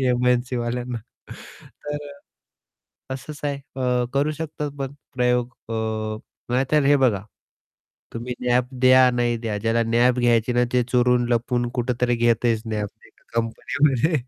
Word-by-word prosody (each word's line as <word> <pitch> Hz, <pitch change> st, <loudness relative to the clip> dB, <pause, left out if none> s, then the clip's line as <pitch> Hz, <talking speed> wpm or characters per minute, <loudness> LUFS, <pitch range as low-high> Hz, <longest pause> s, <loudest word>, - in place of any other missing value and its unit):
एमएनसीवाल्यांना 125 Hz, -1 st, 0 dB, 0.9 s
तर, 145 Hz, 0 st, -4 dB, 1.1 s
तसंच 140 Hz, +3 st, -6 dB
आहे. 145 Hz, -1 st, 0 dB, 0.2 s
अ, 125 Hz, -2 st, +1 dB
करू 145 Hz, +2 st, +2 dB
शकतात 150 Hz, -1 st, -4 dB
पण 135 Hz, 0 st, -3 dB, 0.2 s
प्रयोग 125 Hz, 0 st, +2 dB, 0.2 s
अ, 115 Hz, -, -2 dB, 0.8 s
नाही 130 Hz, +2 st, +2 dB
तर 150 Hz, -2 st, +4 dB
हे 145 Hz, +1 st, +6 dB
बघा, 110 Hz, -7 st, +2 dB, 0.9 s
तुम्ही 120 Hz, +2 st, -5 dB
नॅप 125 Hz, 0 st, +2 dB, 0.2 s
द्या 130 Hz, 0 st, +7 dB
नाही 120 Hz, -1 st, 0 dB
द्या, 110 Hz, -3 st, -3 dB
ज्याला 115 Hz, +2 st, +1 dB
नॅप 120 Hz, +2 st, +3 dB
घ्यायची 120 Hz, -1 st, +3 dB
ना 120 Hz, 0 st, +3 dB
ते 125 Hz, -1 st, +3 dB
चोरून 125 Hz, -1 st, +3 dB
लपून 120 Hz, 0 st, 0 dB
कुठेतरी 125 Hz, 0 st, 0 dB
घेतयचं 115 Hz, -1 st, +1 dB
नॅप 105 Hz, -1 st, -2 dB, 0.2 s
ते -, -, -18 dB, 0.2 s
कंपनीमध्ये. 130 Hz, +6 st, +1 dB
125 Hz, 130 wpm, -23 LUFS, 120-130 Hz, 1.1 s, द्या